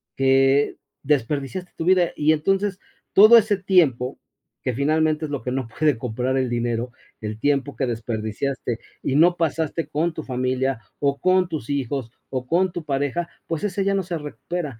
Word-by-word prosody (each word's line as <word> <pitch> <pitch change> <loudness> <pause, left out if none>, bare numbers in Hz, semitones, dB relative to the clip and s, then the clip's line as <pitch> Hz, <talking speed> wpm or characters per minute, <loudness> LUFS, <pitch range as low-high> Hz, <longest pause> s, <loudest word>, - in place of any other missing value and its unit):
que 135 +1 +3 0.3
desperdiciaste 145 +5 -1
tu - - -4
vida 180 -1 +3
y 150 +1 +3
entonces 195 +5 0 0.3
todo 215 +4 +9
ese 210 -2 +3
tiempo 160 -10 +2 0.4
que 130 - -1
finalmente 155 +3 +1
es 150 - -7
lo 140 - -3
que 125 - -3
no 130 -2 -2
puede 150 +1 +1
comprar 125 +3 -2
el 130 -2 0
dinero, 120 0 -2 0.3
el 110 0 -5
tiempo 140 +2 0
que 135 - -1
desperdiciaste, 115 +2 -3 0.2
y 135 - -1
no 175 +2 +5
pasaste 165 0 -1
con 160 +3 0
tu 155 - -6
familia, 130 0 -1 0.2
o 140 -1 0
con 185 -1 +3
tus 150 -7 -5
hijos, 135 -3 -2 0.2
o 130 -1 -4
con 180 +2 +2
tu 170 -3 -6
pareja, 145 +4 -1 0.2
pues 165 +2 -3
ese 200 -1 -1
ya 200 0 +1
no 195 - 0
se 175 -1 -3
recupera. 150 -3 -5
145 Hz, 175 wpm, -23 LUFS, 130-170 Hz, 0.4 s, todo